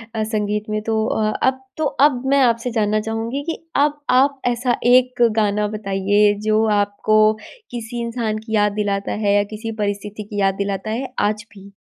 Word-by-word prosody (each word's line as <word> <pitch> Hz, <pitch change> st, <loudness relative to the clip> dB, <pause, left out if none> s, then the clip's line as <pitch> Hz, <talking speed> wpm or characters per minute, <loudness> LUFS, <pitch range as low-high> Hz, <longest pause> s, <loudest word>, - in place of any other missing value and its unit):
अ, 220 Hz, -, 0 dB
संगीत 210 Hz, -1 st, -2 dB
में। 215 Hz, 0 st, -1 dB
तो 220 Hz, -1 st, 0 dB
अ, 215 Hz, -1 st, 0 dB
अब 260 Hz, 0 st, +1 dB, 0.2 s
तो 315 Hz, -, -1 dB, 0.2 s
अब 255 Hz, -4 st, +2 dB
मैं 280 Hz, -, +4 dB
आपसे 235 Hz, 0 st, +1 dB
जानना 215 Hz, -1 st, +1 dB
चाहूँगी 225 Hz, +5 st, -3 dB
कि -, -, -2 dB, 0.2 s
अब 290 Hz, +1 st, +2 dB, 0.2 s
आप 275 Hz, 0 st, +2 dB
ऐसा 245 Hz, 0 st, +1 dB, 0.2 s
एक 255 Hz, -1 st, +3 dB
गाना 210 Hz, -1 st, +1 dB
बताइए 205 Hz, 0 st, +1 dB
जो 215 Hz, +1 st, +3 dB, 0.2 s
आपको 205 Hz, +1 st, +2 dB, 0.5 s
किसी 235 Hz, 0 st, -5 dB
इंसान 230 Hz, -2 st, -2 dB
की 220 Hz, 0 st, -4 dB
याद 210 Hz, 0 st, +3 dB
दिलाता 200 Hz, -1 st, -2 dB
है 200 Hz, -, +3 dB
या 205 Hz, -, +4 dB
किसी 225 Hz, +1 st, -5 dB
परिस्थिति 205 Hz, +1 st, -4 dB
की 205 Hz, 0 st, -6 dB
याद 195 Hz, 0 st, +2 dB
दिलाता 200 Hz, +1 st, -3 dB
है 250 Hz, +3 st, -4 dB
आज 210 Hz, 0 st, 0 dB
भी? 200 Hz, 0 st, -14 dB
215 Hz, 180 wpm, -20 LUFS, 205-240 Hz, 0.5 s, मैं